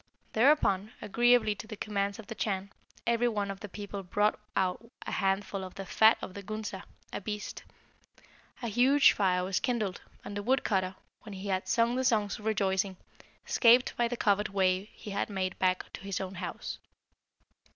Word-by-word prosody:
Thereupon, 220 -5 +3
agreeably 235 0 +3
to 220 +2 -9
the 215 -2 -7
commands 200 -1 -1
of 225 - -10
the 225 - -6
Chan, 200 -3 -2 0.3
every 235 +1 +2
one 205 -4 -1
of 195 - -8
the 210 - -8
people 200 0 -6
brought 205 +3 +1 0.2
out 190 +5 0
a - - -5
handful 195 0 0
of 185 - -8
the 195 - -6
fat 220 +5 +5
of 185 - -6
the 200 - -7
Gunsa 210 -1 -5 0.3
(a - - -3
beast). 210 +1 -5 1.0
A - - -1
huge 255 +6 +5
fire 180 -3 +1
was 185 0 0
kindled, 220 -7 -1 0.2
and 200 - -6
the 205 - -2
wood 255 +5 +2
cutter, 190 -3 0 0.3
when 215 -4 -9
he 195 +1 -6
had 185 -1 -1
sung 230 +4 +3
the 260 - +1
songs 220 -6 +1
of 210 - -11
rejoicing, 195 -2 +1 0.5
escaped 245 +1 +5
by 240 - +2
the 245 0 -4
covered 210 -1 +2
way 190 -1 +2
he 210 - -9
had 200 - -1
made 190 -2 -2
back 185 -1 0
to - - -8
his 195 -1 -3
own 190 0 -4
house. 185 - -5
205 Hz, 185 wpm, -30 LUFS, 190-225 Hz, 1.0 s, fat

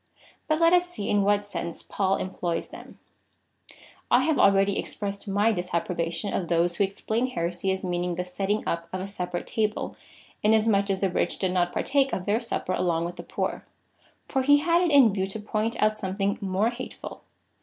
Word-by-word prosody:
But 310 0 +1
let 335 +1 +5
us 360 0 +4
see 210 -13 -3
in 205 - +3
what 205 +1 +2
sense 170 -4 -5
Paul 195 -1 0
employs 175 -2 -3
them, - - -12 1.1
I - - +5
have 315 -2 +1
already 195 0 +4
expressed 200 0 -4
my 205 +3 +3
disapprobation 175 0 -2
of 175 - -1
those 170 +1 +2
who - - +3
explain 220 +5 -1
heresy 180 -5 -2
as 190 0 -2
meaning 175 0 -1
the 180 +1 -3
setting 195 +3 -2
up 170 0 -2
of 185 - -3
a 190 - -4
separate 180 -3 -4
table, 215 -1 -2 0.5
inas 220 +1 +4
much 200 -2 +2
as 195 -1 0
the 195 - +2
rich - - 0
did 190 -2 0
not 175 -1 +1
partake 275 -1 +1
of 180 - -2
their 210 +2 +2
Supper 230 -5 -2
along 170 -2 0
with 175 +1 -6
the - - -5
poor; - - -3 0.6
for 265 - 0
he 285 +2 +6
had 335 +3 +2
it 355 - +2
in 270 -8 +6
view 190 -1 -1
to 195 +3 -6
point 215 +2 -2
out 215 0 +2
something 195 +1 -1
more 200 +4 +1
hateful. 255 +1 -8
200 Hz, 195 wpm, -26 LUFS, 180-220 Hz, 1.1 s, he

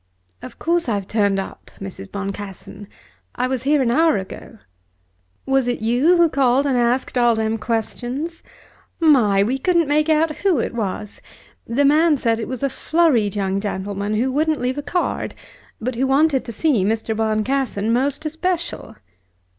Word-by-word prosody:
"Of - - -10
course 335 -4 0
I've 200 -3 -2
turned 205 -3 +1
up, 195 - -6
Mrs. 195 0 -8
Boncassen. 200 0 -7 0.5
I - - 0
was 255 -1 -2
here 285 +1 +2
an 235 - +1
hour 320 +4 +3
ago." 190 +3 -8 0.9
"Was 270 -2 +1
it 245 -2 -2
you 255 +10 +3
who 340 -1 +5
called 270 -2 +2
and 275 -2 +1
asked 245 +1 +1
all 240 -1 +4
them 220 0 -1
questions? 245 +8 -3 0.6
My! 240 - +4
We 255 +6 -1
couldn't 340 +1 +2
make 300 +2 +2
out 310 0 +2
who 385 -6 +2
it 235 - -2
was. 210 -2 -4 0.5
The 275 +5 +1
man 305 +2 +4
said 230 -3 0
it 225 - -4
was 255 +1 -5
a - - +3
flurried 275 - +1
young 195 -1 -1
gentleman 200 +1 -3
who 250 +5 +1
wouldn't 310 +2 +1
leave 255 +3 -1
a - - -2
card, 320 +5 -2 0.4
but 255 +3 -3
who 260 +3 0
wanted 275 0 +2
to 235 - -6
see 245 - +1
Mr. 220 +2 -1
Boncassen 220 0 0
most 280 +5 0
especial." 340 +2 -3
250 Hz, 165 wpm, -21 LUFS, 215-295 Hz, 0.9 s, who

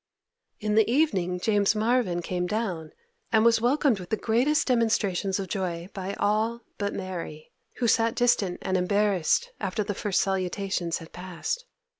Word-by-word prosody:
In 210 -1 -1
the 220 0 +4
evening 190 - +1
James 205 +1 +2
Marvyn 215 -6 +1
came 180 0 -2
down, 180 -7 -3 0.4
and 220 0 +4
was 230 -1 +5
welcomed 255 -2 +2
with 180 - -9
the 220 - 0
greatest 250 +9 +2
demonstrations 215 -6 +1
of 195 - -3
joy 175 -2 -3
by 195 0 -4
all 220 +3 0 0.2
but 200 -1 -1
Mary, 170 -5 -6 0.2
who 240 - 0
sat 225 0 +3
distant 215 -7 +2
and 190 -1 0
embarrassed 195 -2 +1
after 205 +2 -1
the 205 0 -3
first 200 0 0
salutations 190 -2 -1
had 165 - -12
passed. 185 - -4
200 Hz, 155 wpm, -26 LUFS, 180-225 Hz, 0.4 s, was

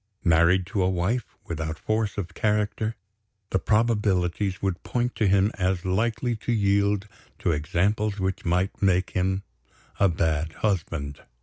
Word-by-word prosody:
Married 85 +2 +4
to 95 +3 -2
a 90 - +3
wife 95 +7 -1
without 80 -1 -4
force 110 -1 -1
of 95 -4 -4
character, 105 +1 0 0.6
the 95 - +2
probabilities 105 -4 +1
would 95 -3 -2
point 120 0 -1
to 110 - +2
him 100 +2 +3
as 90 -1 0
likely 115 +5 0
to 115 - -3
yield 100 -1 +2 0.3
to - - 0
examples 100 +7 0
which 95 0 -2
might 90 +4 0
make 95 -2 +2
him 95 +1 0 0.6
a 100 - +5
bad 80 -1 0
husband. 80 -8 -2
95 Hz, 140 wpm, -26 LUFS, 90-105 Hz, 0.6 s, a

